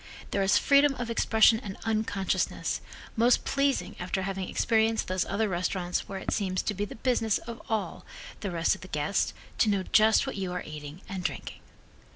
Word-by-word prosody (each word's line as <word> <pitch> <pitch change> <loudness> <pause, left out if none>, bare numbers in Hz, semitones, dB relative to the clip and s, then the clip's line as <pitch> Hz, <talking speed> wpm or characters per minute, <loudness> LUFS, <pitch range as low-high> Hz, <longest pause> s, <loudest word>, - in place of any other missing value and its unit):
There 200 - +1
is 195 +1 +4
freedom 280 0 +4
of 240 -2 -4
expression 220 -1 +4
and 200 -5 -7
unconsciousness, 215 -4 -1 0.3
most 235 +1 +3
pleasing 275 0 0
after 185 +1 -2
having 195 -1 -3
experienced 225 -1 +1
those 185 -1 0
other 215 +2 0
restaurants 180 -1 -2
where 195 - -4
it 190 - -4
seems 185 -3 -1
to 210 - -1
be 205 +1 -2
the - - -9
business 225 -3 +1
of 235 0 -8
all 220 -2 -2 0.4
the 200 - -3
rest 170 -2 +1
of - - -8
the 185 - -9
guests 150 +3 0 0.3
to 220 - +4
know 200 -2 +1
just 215 +5 +4
what 265 - -5
you 190 -2 -3
are 180 - -3
eating 150 +3 -9
and 190 -2 -5
drinking. - - -4
200 Hz, 190 wpm, -28 LUFS, 185-225 Hz, 0.4 s, is